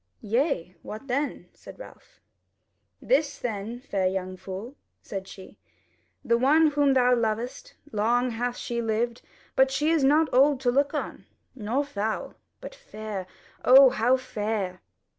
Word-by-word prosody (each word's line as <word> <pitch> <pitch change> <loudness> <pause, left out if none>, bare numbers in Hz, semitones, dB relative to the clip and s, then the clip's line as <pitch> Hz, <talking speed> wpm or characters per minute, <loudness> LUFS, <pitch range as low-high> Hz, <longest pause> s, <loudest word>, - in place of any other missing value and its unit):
"Yea, 215 - -1
what 215 +5 -8
then?" 275 +3 -2
said - - -13
Ralph. - - -14 0.8
"This 305 - +1
then, 225 0 -4
fair 200 -8 -1
young 185 0 -3
fool," 195 +8 -8 0.3
said 195 -2 -6
she: 190 -1 -13 0.7
"the 235 0 +2
one 305 +4 +4
whom 285 -2 +2
thou 250 -1 +4
lovest, 235 - -3 0.2
long 240 +4 +1
hath 245 +2 -3
she 235 -1 -3
lived, 230 +1 -1 0.3
but 265 0 +4
she 295 +4 +1
is 325 -4 +2
not 300 +4 +4
old 275 +1 +4
to 245 -2 +2
look 280 +3 +1
on, - - -5 0.3
nor 250 +3 -1
foul; 220 -6 -3 0.3
but - - -8
fair 215 - -7 0.4
O 265 0 +8
how 250 +1 +2
fair!" 210 -7 -3
245 Hz, 140 wpm, -26 LUFS, 215-275 Hz, 0.8 s, O